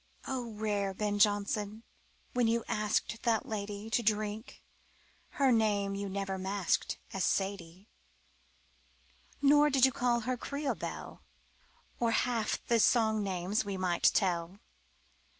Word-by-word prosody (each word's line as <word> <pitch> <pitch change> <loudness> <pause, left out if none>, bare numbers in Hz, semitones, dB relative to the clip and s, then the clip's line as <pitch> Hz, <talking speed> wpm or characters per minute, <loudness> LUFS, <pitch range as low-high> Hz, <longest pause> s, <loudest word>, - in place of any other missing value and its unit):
O 245 -4 -4
rare 205 -2 -1
Ben 205 0 -1
Jonson, 205 +1 +1 0.5
when 245 -2 +2
you 230 0 +1
asked 215 +2 -1
That 230 -3 +1
lady 205 0 -5
To 235 - +2
drink, 215 +1 -2 0.7
her 275 -2 +4
name 205 -3 +2
you 200 0 -4
never 195 0 -3
masked 190 0 -1 0.2
As 195 - -1
"Sadie," 190 -1 -2 1.6
Nor 295 +1 +6
did 265 -2 +5
you 265 - +3
call 240 -1 +1
her 250 +2 -2
"Creole 280 +3 -2
Belle" - - -7 0.8
Or 230 -1 +1
half 235 -3 0
the 235 -1 +2
song 220 -2 +3
names 195 +3 -1
we 200 -2 -4
might 180 -2 +3
tell. 175 -1 0
210 Hz, 130 wpm, -31 LUFS, 200-235 Hz, 1.6 s, Nor